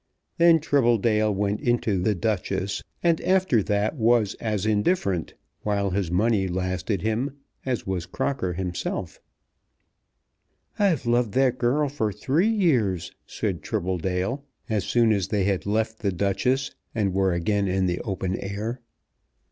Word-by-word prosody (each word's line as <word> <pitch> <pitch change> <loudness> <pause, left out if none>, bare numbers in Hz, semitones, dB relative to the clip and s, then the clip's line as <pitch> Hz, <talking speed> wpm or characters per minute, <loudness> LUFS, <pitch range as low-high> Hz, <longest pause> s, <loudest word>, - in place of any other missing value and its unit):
Then 170 -1 +6
Tribbledale 115 -7 +2
went 100 +1 -1
into 115 -6 +1
"The 105 +3 +1
Duchess," 100 0 -1 0.2
and 170 -2 +3
after 185 - +3
that 105 +5 0
was 115 -4 +3
as 105 -3 -1
indifferent, 105 - 0 0.3
while 100 -2 0
his 95 -2 -1
money 100 +2 +2
lasted 95 +2 -2
him, 120 +6 -1 0.3
as 125 -4 -1
was 95 -3 -3
Crocker 95 -10 -2
himself. 90 0 -4 1.6
"I've 190 - +2
loved 120 -3 +1
that 130 -1 +2
girl 140 +5 +2
for 120 -7 -1
three 145 - +1
years," 125 - +1 0.2
said - - -3
Tribbledale, 95 - -2 0.3
as 110 -5 -1
soon 115 -2 +3
as 100 -3 +1
they 100 -1 0
had 100 0 0
left 110 +1 0
"The 100 -3 0
Duchess" 125 +9 0 0.2
and 100 -4 0
were 95 0 +2
again 100 +4 0
in 95 0 +1
the 90 -1 0
open 95 -4 -2
air. 105 +5 -4
105 Hz, 140 wpm, -25 LUFS, 95-120 Hz, 1.6 s, Then